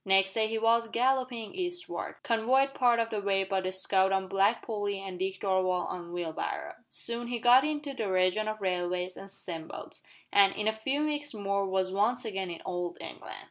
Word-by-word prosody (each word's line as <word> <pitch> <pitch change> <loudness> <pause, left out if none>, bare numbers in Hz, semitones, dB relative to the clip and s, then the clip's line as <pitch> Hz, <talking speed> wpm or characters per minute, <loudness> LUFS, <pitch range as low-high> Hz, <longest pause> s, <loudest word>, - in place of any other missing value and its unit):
Next 195 0 +3
day 220 -1 +2
he 225 +1 -2
was 230 +1 +3
galloping 250 -1 0
eastward 355 -1 -4
convoyed 255 +4 +2
part 245 -3 +3
of 230 0 0
the 210 -2 -1
way 195 -1 +2
by 190 0 -1
the 185 0 -2
scout 190 0 +2
on 190 0 +1
Black 195 +4 +2
Polly 205 -3 -2
and 190 -2 -7
Dick 190 0 -2
Darvall 185 -2 +1
on 175 -1 -6
Wheelbarrow. 175 -2 -3 0.2
Soon 235 0 -3
he 245 0 -2
got 245 +3 +6
into 300 -2 -2
the 220 -7 -2
region 185 +3 +2
of 215 0 -3
railways 180 -1 -1
and 195 - -10
steam 170 -4 -7
boats, - - -7 0.3
and, 195 -1 +6
in 210 - -1
a 220 - +3
few 270 +7 -1
weeks 290 -3 -2
more 200 -1 0
was 190 0 0
once 235 +5 +1
again 195 -4 -3
in 170 - -7
Old 175 -1 -3
England. - - -8
200 Hz, 200 wpm, -30 LUFS, 190-235 Hz, 0.3 s, got